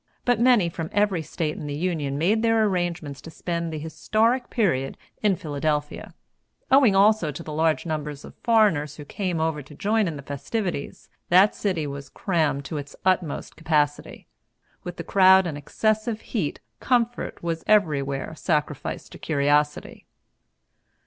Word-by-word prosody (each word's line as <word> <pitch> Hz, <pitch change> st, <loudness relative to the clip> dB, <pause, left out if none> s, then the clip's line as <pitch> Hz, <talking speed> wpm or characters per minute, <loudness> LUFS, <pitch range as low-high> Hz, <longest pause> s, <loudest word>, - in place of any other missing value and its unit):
But 245 Hz, -2 st, +2 dB
many 240 Hz, -7 st, +5 dB
from 165 Hz, -1 st, -5 dB
every 205 Hz, -4 st, +2 dB
State 155 Hz, 0 st, -3 dB
in 150 Hz, -, -6 dB
the 145 Hz, -, -3 dB
Union 150 Hz, -4 st, -2 dB
made 200 Hz, +9 st, +2 dB
their 225 Hz, -1 st, +3 dB
arrangements 175 Hz, -7 st, -2 dB
to -, -, -10 dB
spend 170 Hz, 0 st, -3 dB
the 155 Hz, -, -4 dB
historic 220 Hz, -, 0 dB
period 155 Hz, -, 0 dB, 0.2 s
in 205 Hz, -3 st, +3 dB
Philadelphia. 150 Hz, -1 st, -3 dB, 0.6 s
Owing, 260 Hz, -7 st, +6 dB
also, 200 Hz, -4 st, +4 dB
to 150 Hz, +4 st, -8 dB
the 155 Hz, -, -7 dB
large 160 Hz, +1 st, +1 dB
number 155 Hz, -2 st, -3 dB
of 145 Hz, -1 st, -10 dB
foreigners 205 Hz, -, +3 dB
who 150 Hz, -, -10 dB
came 180 Hz, 0 st, -3 dB
over 160 Hz, -2 st, -1 dB
to 145 Hz, +2 st, -14 dB
join 210 Hz, +4 st, +1 dB
in 165 Hz, -, -3 dB
the 140 Hz, -, -8 dB
festivities, 155 Hz, -, -4 dB, 0.2 s
that 190 Hz, +4 st, +6 dB
city 180 Hz, -7 st, -1 dB
was 140 Hz, -1 st, -7 dB
crammed 155 Hz, -7 st, -1 dB
to 155 Hz, -, -4 dB
its 145 Hz, -1 st, -7 dB
utmost 180 Hz, -5 st, 0 dB
capacity. 150 Hz, -3 st, -1 dB, 0.6 s
With 175 Hz, -1 st, -7 dB
the -, -, -5 dB
crowd 190 Hz, -1 st, +6 dB
and 160 Hz, -4 st, -3 dB
excessive 215 Hz, -, -1 dB
heat, 190 Hz, -11 st, -3 dB, 0.2 s
comfort 245 Hz, -5 st, 0 dB
was 165 Hz, -1 st, -2 dB
everywhere 150 Hz, -9 st, +1 dB
sacrificed 150 Hz, -3 st, -2 dB
to -, -, -11 dB
curiosity. 145 Hz, 0 st, 0 dB
165 Hz, 155 wpm, -24 LUFS, 150-205 Hz, 0.6 s, Owing